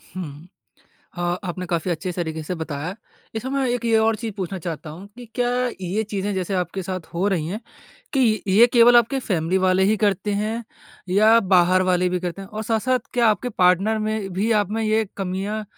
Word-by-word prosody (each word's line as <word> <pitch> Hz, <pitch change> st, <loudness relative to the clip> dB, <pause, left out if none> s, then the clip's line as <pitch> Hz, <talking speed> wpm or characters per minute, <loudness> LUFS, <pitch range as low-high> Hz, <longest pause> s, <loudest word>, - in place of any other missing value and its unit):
हुँ। 160 Hz, -2 st, -7 dB, 0.7 s
अ, -, -, -3 dB, 0.2 s
आपने 180 Hz, 0 st, -4 dB
काफ़ी 175 Hz, 0 st, -1 dB
अच्छे 170 Hz, +2 st, -2 dB
स -, -, -12 dB
तरीके 160 Hz, -2 st, -3 dB
से 170 Hz, +4 st, -4 dB
बताया। 160 Hz, +1 st, -4 dB, 0.4 s
इस 220 Hz, -, -3 dB
समय 265 Hz, -1 st, -1 dB
एक 240 Hz, -1 st, -4 dB
ये 225 Hz, -1 st, +3 dB
और 220 Hz, 0 st, +2 dB
चीज़ 225 Hz, 0 st, -5 dB
पूछना 190 Hz, -1 st, -4 dB
चाहता 155 Hz, -3 st, -6 dB
हूँ, 180 Hz, +6 st, -10 dB
कि 245 Hz, -, -9 dB
क्या 245 Hz, -1 st, +1 dB, 0.3 s
ये 190 Hz, +4 st, -1 dB
चीज़ें 205 Hz, 0 st, -2 dB
जैसे 190 Hz, +1 st, -2 dB
आपके 180 Hz, +1 st, -2 dB
साथ 185 Hz, -2 st, -5 dB
हो 175 Hz, +4 st, 0 dB
रही 165 Hz, -6 st, -1 dB
हैं, 205 Hz, +6 st, -4 dB, 0.5 s
कि 240 Hz, -6 st, +2 dB
ये 210 Hz, +5 st, +7 dB
केवल 240 Hz, 0 st, +7 dB
आपके 240 Hz, +3 st, +3 dB
फ़ैमिली 180 Hz, -5 st, 0 dB
वाले 185 Hz, 0 st, +3 dB
ही 215 Hz, +2 st, +3 dB
करते 205 Hz, 0 st, 0 dB
हैं 225 Hz, +2 st, -3 dB, 0.4 s
या 215 Hz, +5 st, +5 dB
बाहर 185 Hz, +1 st, +5 dB
वाले 180 Hz, -1 st, +2 dB
भी 180 Hz, 0 st, -1 dB
करते 180 Hz, +2 st, -4 dB
हैं? 195 Hz, -, -10 dB
और 215 Hz, +1 st, -5 dB
साथ-साथ 235 Hz, +3 st, +1 dB
क्या 240 Hz, -2 st, +3 dB
आपके 215 Hz, +4 st, 0 dB
पार्टनर 185 Hz, +5 st, +3 dB
में 215 Hz, -2 st, -2 dB
भी 200 Hz, +5 st, 0 dB
आप 205 Hz, -1 st, -3 dB
में 225 Hz, +1 st, -1 dB
ये 220 Hz, 0 st, +2 dB
कमियाँ 195 Hz, +3 st, -3 dB
195 Hz, 205 wpm, -22 LUFS, 180-220 Hz, 0.7 s, ये